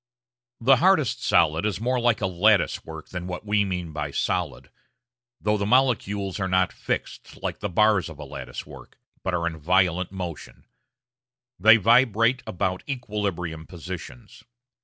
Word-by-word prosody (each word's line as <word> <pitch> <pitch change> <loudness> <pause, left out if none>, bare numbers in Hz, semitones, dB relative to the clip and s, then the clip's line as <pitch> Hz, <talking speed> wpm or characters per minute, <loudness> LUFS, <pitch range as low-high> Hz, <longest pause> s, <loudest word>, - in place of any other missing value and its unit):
The 130 +3 +5
hardest 160 - +2
solid 80 +2 +3
is 105 -3 -1
more 125 +2 0
like 120 -2 +1
a - - +1
lattice 100 +3 +2
work 80 -1 -10
than 90 -1 -6
what 90 +3 -6
we 105 0 +1
usually 100 -1 +1
mean 85 -2 -7
by 75 -1 -3
"solid"; - - -2 0.7
though 105 0 +1
the 100 - -1
molecules 105 -6 +1
are 95 - -1
not 95 -1 +1
fixed, - - -5
like - - -3
the 105 - -3
bars 105 -1 +3
of 80 - -11
a 75 - -8
lattice 65 -3 -8
work, - - -14 0.2
but 95 -2 -1
are 85 -1 -1
in 80 -2 -3
violent 90 +2 +1
motion; 90 -5 -7 0.9
they 110 +4 +7
vibrate 115 +2 +3
about 95 0 -2
equilibrium 100 - -4
positions. 90 +6 -9
95 Hz, 160 wpm, -25 LUFS, 85-110 Hz, 0.9 s, they